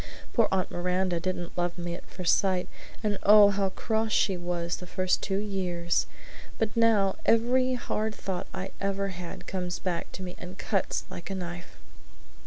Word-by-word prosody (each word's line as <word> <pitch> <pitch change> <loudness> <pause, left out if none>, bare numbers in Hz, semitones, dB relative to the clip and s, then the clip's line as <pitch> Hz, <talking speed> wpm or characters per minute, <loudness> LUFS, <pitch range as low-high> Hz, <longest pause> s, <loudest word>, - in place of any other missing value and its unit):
Poor 230 -3 +4
Aunt 190 -2 0
Miranda 180 0 0
didn't 175 0 -3
love 175 0 -1
me 175 0 -3
at - - -9
first 180 -3 +2
sight, 185 -2 +1 0.4
and 205 -2 0
oh, 205 0 +8
how 195 -1 +1
cross 220 +3 -1
she 195 -2 +3
was 175 -1 -2
the 180 - -9
first 185 0 +1
two 195 -1 -1
years! 185 -4 0 0.5
But 220 -1 -1
now 220 -4 +4
every 255 +3 +3
hard 220 -3 -2
thought 190 -2 -4
I 190 +1 -5
ever 195 0 0
had 180 0 -7
comes 180 -2 -3
back 180 -3 -3
to 190 - -6
me 180 -1 -6
and 180 +1 -8
cuts 195 -4 0
like 175 - -7
a 195 - -2
knife!" 175 -1 -6
190 Hz, 175 wpm, -28 LUFS, 175-205 Hz, 0.5 s, oh